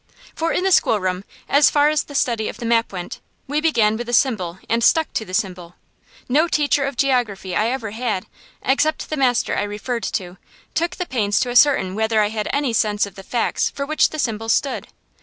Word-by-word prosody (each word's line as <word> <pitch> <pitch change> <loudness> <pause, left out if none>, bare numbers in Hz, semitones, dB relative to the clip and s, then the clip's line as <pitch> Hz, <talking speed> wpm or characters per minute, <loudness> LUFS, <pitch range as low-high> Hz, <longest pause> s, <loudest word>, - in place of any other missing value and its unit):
For 330 +1 -1
in 360 - 0
the 385 - +2
schoolroom, 185 - +2 0.2
as 285 +1 +5
far 295 0 +3
as 305 -1 0
the 285 - -11
study 230 -5 0
of - - -8
the 235 - -6
map 230 0 +2
went, 180 -2 -6 0.3
we 290 +2 -1
began 225 -9 +2
with 240 0 -5
the 240 - -4
symbol 210 -10 +1
and 230 +1 0
stuck 320 +6 +3
to 220 - -2
the 185 - -11
symbol. 180 -5 -3 0.5
No 300 +7 +3
teacher 290 -3 +1
of 275 -2 -4
geography 240 -9 0
I 215 - +2
ever 235 -4 -3
had, 220 -4 -2 0.4
except 305 +5 0
the - - 0
master 255 -4 +1
I - - 0
referred 210 +4 -3
to, 180 -1 -4 0.4
took 340 +1 -1
the 360 - -3
pains 210 -9 0
to 245 - -1
ascertain 245 -7 +4
whether 220 +1 +1
I 210 -1 +2
had 215 -1 -3
any 280 -4 0
sense 210 -2 +1
of 200 - -11
the 195 - -10
facts 230 +4 -1
for 280 - -5
which 310 +2 +2
the 310 - -7
symbols 225 -5 0
stood. 275 - -2
235 Hz, 215 wpm, -21 LUFS, 210-280 Hz, 0.5 s, as